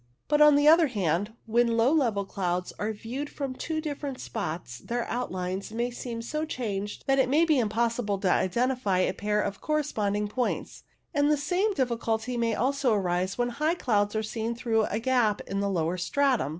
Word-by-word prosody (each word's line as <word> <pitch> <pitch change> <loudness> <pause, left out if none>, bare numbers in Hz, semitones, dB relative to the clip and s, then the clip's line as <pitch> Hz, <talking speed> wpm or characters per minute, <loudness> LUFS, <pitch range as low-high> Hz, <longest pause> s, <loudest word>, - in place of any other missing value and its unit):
But, 295 0 +3
on 300 -1 +8
the 290 +1 +4
other 325 +1 +7
hand, 200 - -1
when 230 0 +2
low 235 +4 +4
level 230 -10 +1
clouds 180 -2 -2
are 210 +1 -1
viewed 245 +7 -5
from 275 -3 -4
two 315 +4 -3
different 285 -3 -4
spots 155 - -5
their 240 0 -3
outlines 190 -5 -3
may 240 +2 -1
seem 235 -1 -5
so 305 +6 -3
changed 210 -9 -4
that 270 -1 +3
it 260 - +3
may 310 +5 +4
be 310 -5 +3
impossible 225 -1 0
to 185 - +2
identify 235 0 +1
a 185 0 +2
pair 210 +2 -1
of 200 - -4
correspond 285 -10 0
ing 210 0 -1
points, 245 +4 -3 0.3
and 290 -1 +3
the 300 - +3
same 365 +8 0
difficulty 235 -2 -1
may 230 -2 +1
also 270 0 +1
arise 185 -1 -1
when 245 0 +1
high 305 +7 0
clouds 205 -8 +1
are 220 - 0
seen 225 +2 -3
through 225 -2 +1
a 210 - -2
gap 235 -3 +2
in 195 0 -3
a 200 - 0
lower 170 -1 0
stratum. 260 - +1
235 Hz, 190 wpm, -27 LUFS, 205-275 Hz, 0.3 s, on